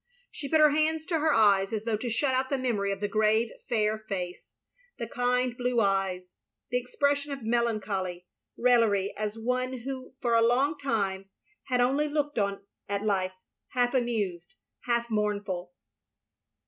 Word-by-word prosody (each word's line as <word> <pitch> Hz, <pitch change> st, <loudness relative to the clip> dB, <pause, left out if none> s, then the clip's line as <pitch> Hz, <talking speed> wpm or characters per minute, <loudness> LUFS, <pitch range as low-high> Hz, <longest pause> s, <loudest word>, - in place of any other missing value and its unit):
She 280 Hz, -, -6 dB
put 315 Hz, -, +4 dB
her 305 Hz, -1 st, +7 dB
hands 310 Hz, +1 st, +1 dB
to 330 Hz, -2 st, 0 dB
her 310 Hz, +1 st, +3 dB
eyes 200 Hz, -5 st, +4 dB
as 220 Hz, -1 st, -2 dB
though 225 Hz, -1 st, 0 dB
to 240 Hz, +3 st, -4 dB
shut 260 Hz, +4 st, +1 dB
out 260 Hz, 0 st, 0 dB
the 275 Hz, -, +1 dB
memory 220 Hz, -6 st, 0 dB
of 195 Hz, -, -4 dB
the 205 Hz, -, +1 dB
grave 215 Hz, +2 st, +2 dB, 0.2 s
fair 215 Hz, -2 st, +1 dB
face, 190 Hz, -5 st, -6 dB, 0.4 s
the 235 Hz, -, -3 dB
kind 245 Hz, +1 st, 0 dB
blue 245 Hz, -1 st, 0 dB
eyes, 195 Hz, -3 st, 0 dB, 0.4 s
the 245 Hz, -, +2 dB
expression 285 Hz, +3 st, 0 dB
of 275 Hz, -3 st, -5 dB
melancholy 210 Hz, -6 st, -1 dB, 0.3 s
raillery 230 Hz, -5 st, +3 dB
as 215 Hz, +1 st, -3 dB
of 225 Hz, -, -9 dB
one 255 Hz, +1 st, -1 dB
who 260 Hz, 0 st, -6 dB
for 240 Hz, -2 st, 0 dB
a 230 Hz, -, +5 dB
long 260 Hz, +6 st, +3 dB
time 200 Hz, -9 st, -2 dB, 0.4 s
had 250 Hz, -2 st, +1 dB
only 275 Hz, +5 st, +2 dB
looked 295 Hz, -3 st, -1 dB
on 200 Hz, -1 st, -1 dB, 0.2 s
at 200 Hz, +1 st, -2 dB
life 190 Hz, -3 st, +1 dB, 0.2 s
— -, -, -60 dB
half 245 Hz, 0 st, +2 dB
amused, 210 Hz, -9 st, -1 dB, 0.3 s
half 235 Hz, -1 st, +1 dB
mournful. 200 Hz, -4 st, -1 dB
230 Hz, 170 wpm, -28 LUFS, 200-255 Hz, 0.4 s, her